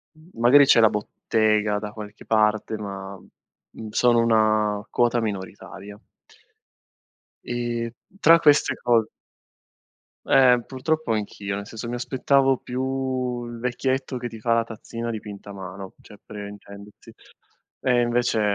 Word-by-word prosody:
mhmm, 155 +2 -20
magari 135 +5 +7
c'è 125 - +5
la 110 -1 +6
bottega 105 0 0
da 105 0 -6
qualche 105 -1 -10
parte, 110 0 +1
ma, 100 -1 -7
mhmm, 110 +4 -15
sono 120 +2 +3
una 110 -2 +2
quota 120 0 +1
minoritaria. 100 0 -7 1.4
Ehm, 120 -1 -3 0.3
tra 165 -1 +6
queste 150 -2 +4
co 115 -2 +2 1.2
Eh, 125 -2 +5
purtroppo 145 0 -1
anch'io, 100 -2 -4
nel 100 0 -6
senso 115 +2 -7
mi 120 - -3
aspettavo 135 +2 +2
più 130 -1 -3
il 120 0 -8
vecchietto 130 +2 -2
che 120 0 -4
ti 115 -2 -11
fa 115 +1 +2
la 115 0 +2
tazzina 115 +1 -7
dipinta 105 -2 -8
a - - -9
mano 95 0 -9
cioè 105 - -15
pre 105 -1 -8
intendersi, 100 0 -13 0.7
e 125 -2 +2
invece, 120 -1 +1
115 Hz, 135 wpm, -23 LUFS, 105-125 Hz, 1.4 s, magari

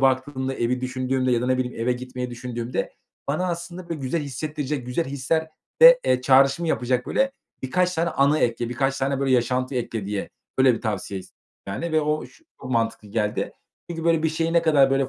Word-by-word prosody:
baktığımda, 130 0 +1
evi 125 +1 0
düşündüğümde 130 0 0
ya 120 - +2
da - - -1
ne 130 0 +2
bileyim 125 -2 -3
eve 125 +2 +2
gitmeyi 125 0 -5
düşündüğümde 120 0 -4 0.4
bana 165 +6 0
aslında, 170 +1 -5
böyle, 165 -3 -4
güzel 135 +5 -1
hissettirecek, 145 -1 -4
güzel 125 +7 -1
hislerde, 150 +4 -1 0.5
eee, 125 - +2
çağrışımı 135 +5 +4
yapacak, 125 -1 0
böyle, 270 0 +1 0.3
birkaç 180 +7 +1
tane 170 +1 0
anı 140 +3 +3
ekle, 120 -2 0
birkaç 135 +2 0
tane, 135 0 0
böyle, 135 -1 +1
yaşantı 125 +2 +1
ekle 115 -4 -3
diye. 100 -1 -3 0.3
Öyle 130 -2 +6
bir - - -6
tavsiye 100 -3 -3
ist - - -16 0.3
yani, 160 +12 -3
ve 155 - +4
o 150 0 -1
ş 325 - -22 0.2
çok - - -7
mantıklı 115 -3 -1
geldi. 105 0 -1 0.4
Çünkü, 165 -1 -4
böyle, 165 -1 +3
bir 160 - +3
şeyi 165 +1 -1
ne 170 -1 +4
kadar, 145 -4 +5
böyle, 135 -1 +2
130 Hz, 195 wpm, -24 LUFS, 125-155 Hz, 0.5 s, Öyle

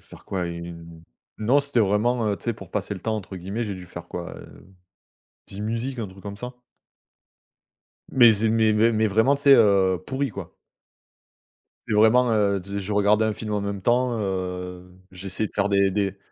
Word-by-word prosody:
faire - - -15
quoi 90 -2 -3
une 85 -1 -8 0.4
Non 125 +7 +3
c'était 140 -4 0
vraiment, 110 +3 +1
heu, 100 - 0
tu - - -15
sais 120 - 0
«pour - - -12
passer 100 0 -3
le 95 - -9
temps» 110 +3 -2
entre 95 -2 -7
guillemets 100 +6 -4
j'ai 100 -3 -4
dû 90 -1 -10
faire - - -9
quoi, - - -6
heu, 95 - -15 0.7
10 100 - -9
musiques 115 +4 -3
un 105 -4 -3
truc 95 0 -15
comme 100 -1 -7
ça. 125 +2 -7 1.6
Mais 120 -3 +7
c'est 110 +2 +1
mais, 110 -1 +3
mais, 115 +2 +3
mais 110 0 +2
vraiment 110 +8 +3
tu 140 - -10
sais, 140 -1 +8
heu, 95 -6 +3
pourri, 135 0 -2
quoi. 100 -5 -9 1.3
C'est 110 - 0
vraiment, 115 +3 +5
heu, 100 -2 +2
d 100 +2 -5
je 100 +2 -5
regardais 105 +2 +3
un 110 - +1
film 105 0 -6
en 105 - 0
même 100 0 -4
temps, 120 +2 +1
heu, 90 -2 -4 0.2
j'essayais 95 +3 -3
de - - -27
faire 100 0 +1
des 100 -1 +2
des 100 -1 -1
105 Hz, 200 wpm, -24 LUFS, 95-115 Hz, 1.6 s, sais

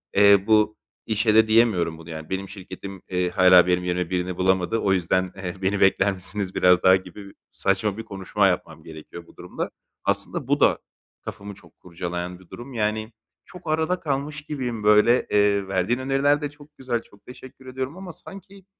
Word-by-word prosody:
eee, 100 -1 +6
bu 110 -1 +3 0.3
işe 110 0 +1
de 110 0 +6
diyemiyorum 110 -8 +2
bunu; 80 +1 -13
yani 80 -1 -8
"Benim 95 +1 -4
şirketim, 95 -1 -9
eee, 90 -1 0
hâlâ 90 -1 +6
benim 90 0 +1
yerime 90 -1 -2
birini 90 -1 -2
bulamadı. 95 +3 +1
O 95 - +1
yüzden, 95 0 0
eee, 95 -2 -6
beni 95 +1 0
bekler 95 +1 +3
misiniz 95 +1 -4
biraz 90 0 +4
daha?" 95 0 +7
gibi 95 +2 -7
bir, - - -19 0.2
saçma 95 +1 -1
bir 115 - -5
konuşma 100 -1 0
yapmam 80 -4 -3
gerekiyor 80 +2 -11
bu - - -19
durumda. - - -5 0.3
Aslında - - -2
bu - - +1
da - - +3 0.4
kafamı 100 0 -8
çok 90 -4 -20
kurcalayan 90 +1 -6
bir 95 - -20
durum. 125 +3 -10
Yani 110 0 -2 0.3
çok 180 -2 -13
arada 160 +3 0
kalmış 145 0 -3
gibiyim 125 -7 -5
böyle. 105 +4 +4
Eee, 100 -1 +2
verdiğin 95 +6 0
öneriler 135 +2 +1
de 145 - -3
çok 145 0 -19
güzel. 125 -3 -2
Çok 100 -2 -23
teşekkür 130 +1 -13
ediyorum 130 +5 -5
ama 185 -2 -8
sanki, 195 +2 -13
100 Hz, 180 wpm, -23 LUFS, 90-120 Hz, 0.4 s, daha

